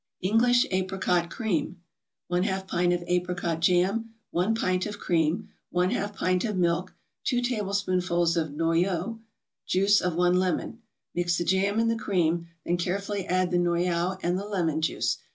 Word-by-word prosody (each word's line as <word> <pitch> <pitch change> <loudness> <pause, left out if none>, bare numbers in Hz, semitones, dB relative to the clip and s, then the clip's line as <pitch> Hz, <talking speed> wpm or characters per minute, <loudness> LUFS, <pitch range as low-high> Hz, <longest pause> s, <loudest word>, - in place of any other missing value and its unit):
ENGLISH 245 +5 +4
APRICOT 185 -2 0
CREAM 190 - -2 0.5
1/2 190 +2 0
pint 175 0 +1
of 175 0 0
apricot 180 -2 -1
jam 190 +7 +1 0.2
1 185 +6 +1
pint 185 -3 0
of 205 0 -6
cream 165 -3 0 0.3
1/2 200 +3 0
pint 185 -1 +1
of 210 -4 -2
milk 175 +1 0 0.3
2 245 - +2
tablespoonfuls 185 -7 0
of 160 -2 0
noyau 170 +7 0 0.5
Juice 200 +2 +4
of 180 -2 -1
one 180 +1 +3
lemon 185 +5 -1 0.3
Mix 175 -1 0
the - - 0
jam 195 +3 +2
and 230 0 +2
the - - 0
cream, 175 -6 0 0.2
then 175 - +1
carefully 195 +2 -2
add 185 0 +1
the 175 - +2
noyau 175 +1 +1
and 175 +2 +1
the 200 - -5
lemon 165 -6 0
juice. 160 - 0
180 Hz, 155 wpm, -27 LUFS, 175-200 Hz, 0.5 s, ENGLISH